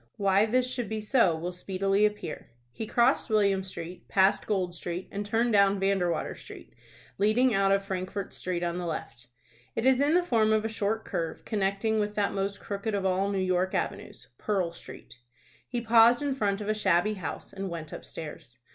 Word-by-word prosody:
Why 200 Hz, +1 st, +3 dB
this 250 Hz, +3 st, +2 dB
should 245 Hz, -4 st, -3 dB
be 220 Hz, 0 st, -2 dB
so 210 Hz, -5 st, +3 dB
will 170 Hz, +3 st, -4 dB
speedily 195 Hz, +3 st, +1 dB
appear. 210 Hz, -6 st, -7 dB, 0.2 s
He 220 Hz, -, -6 dB
crossed 240 Hz, +4 st, +2 dB
William 200 Hz, -3 st, +2 dB
Street, 175 Hz, -1 st, -8 dB
passed 190 Hz, 0 st, +3 dB
Gold 185 Hz, -4 st, 0 dB
Street, 175 Hz, +1 st, -5 dB
and 200 Hz, +1 st, -3 dB
turned 225 Hz, +3 st, +1 dB
down 200 Hz, -1 st, +4 dB
Vandewater 195 Hz, -3 st, 0 dB
Street, -, -, -12 dB, 0.5 s
leading 225 Hz, +5 st, +3 dB
out 195 Hz, -1 st, +3 dB
of 195 Hz, 0 st, +2 dB
Frankfort's 190 Hz, 0 st, -4 dB
Street 180 Hz, -1 st, -3 dB
on 175 Hz, 0 st, -2 dB
the 175 Hz, -, -3 dB
left. 125 Hz, -6 st, -6 dB, 0.5 s
It 225 Hz, -, -1 dB
is 260 Hz, -1 st, +5 dB
in 295 Hz, +3 st, +3 dB
the 360 Hz, -, +4 dB
form 220 Hz, -9 st, +2 dB
of 215 Hz, 0 st, +1 dB
a -, -, -1 dB
short 220 Hz, 0 st, -2 dB
curve, 165 Hz, -3 st, -4 dB
connecting 205 Hz, +1 st, 0 dB
with 210 Hz, 0 st, -2 dB
that 205 Hz, -1 st, 0 dB
most 200 Hz, 0 st, -2 dB
crooked 205 Hz, +1 st, -3 dB
of 195 Hz, -1 st, -2 dB
all 190 Hz, +1 st, +1 dB
New 200 Hz, -, -1 dB
York 185 Hz, 0 st, 0 dB
avenues, -, -, -4 dB
Pearl 190 Hz, -5 st, 0 dB
Street. 120 Hz, -7 st, -12 dB, 0.5 s
He 240 Hz, -1 st, -3 dB
paused 235 Hz, +3 st, +5 dB
in 285 Hz, -1 st, 0 dB
front 205 Hz, -5 st, -1 dB
of 205 Hz, -, -5 dB
a 215 Hz, -, +2 dB
shabby 205 Hz, -1 st, +2 dB
house, 190 Hz, -, -6 dB
and 195 Hz, 0 st, -4 dB
went 165 Hz, -3 st, -7 dB
upstairs. 145 Hz, -6 st, -9 dB
200 Hz, 190 wpm, -28 LUFS, 185-220 Hz, 0.5 s, is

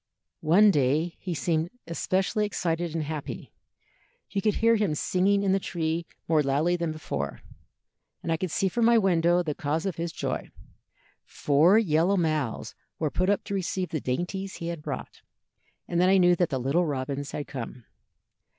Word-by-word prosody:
"One 200 Hz, +7 st, +5 dB
day 150 Hz, +3 st, +1 dB
he 180 Hz, -3 st, -4 dB
seemed 160 Hz, +1 st, 0 dB, 0.2 s
specially 190 Hz, +5 st, 0 dB
excited 170 Hz, -4 st, -2 dB
and 160 Hz, -, 0 dB
happy; 150 Hz, -1 st, -6 dB, 0.8 s
you 200 Hz, -, -1 dB
could 215 Hz, +1 st, +1 dB
hear 230 Hz, 0 st, +4 dB
him 205 Hz, -8 st, +1 dB
singing 195 Hz, +5 st, +1 dB
in 195 Hz, -, +2 dB
the 195 Hz, -, +3 dB
tree 165 Hz, -2 st, -2 dB, 0.2 s
more 160 Hz, -2 st, +4 dB
loudly 150 Hz, +5 st, +1 dB
than 170 Hz, -2 st, -2 dB
before, 70 Hz, -, -4 dB, 0.8 s
and 165 Hz, -, -2 dB
I 165 Hz, -, +2 dB
could 185 Hz, +2 st, -3 dB
see 195 Hz, -, +1 dB
from 230 Hz, +5 st, +1 dB
my 235 Hz, 0 st, +6 dB
window 175 Hz, -3 st, +3 dB
the 155 Hz, -3 st, -2 dB
cause 155 Hz, +2 st, -2 dB
of 195 Hz, -, -2 dB
his 170 Hz, 0 st, -3 dB
joy. -, -, -4 dB, 0.7 s
Four 155 Hz, +8 st, +3 dB
yellow 180 Hz, -1 st, +3 dB
mouths 155 Hz, -, -1 dB, 0.2 s
were 155 Hz, -3 st, -1 dB
put 185 Hz, +1 st, 0 dB
up 200 Hz, -1 st, +1 dB
to -, -, -6 dB
receive 185 Hz, -1 st, -2 dB
the 155 Hz, -, -3 dB
dainties 185 Hz, +9 st, -3 dB
he 170 Hz, -, -5 dB
had 170 Hz, -3 st, -5 dB
brought, -, -, -6 dB, 0.7 s
and 175 Hz, 0 st, +1 dB
then 180 Hz, -, +4 dB
I 195 Hz, -, +5 dB
knew 175 Hz, -1 st, +5 dB
that 175 Hz, -1 st, +1 dB
the 135 Hz, -, -1 dB
little 150 Hz, +8 st, +1 dB
robins 140 Hz, 0 st, -3 dB
had 145 Hz, -, -4 dB
come. 125 Hz, -3 st, -7 dB
170 Hz, 180 wpm, -27 LUFS, 150-190 Hz, 0.8 s, my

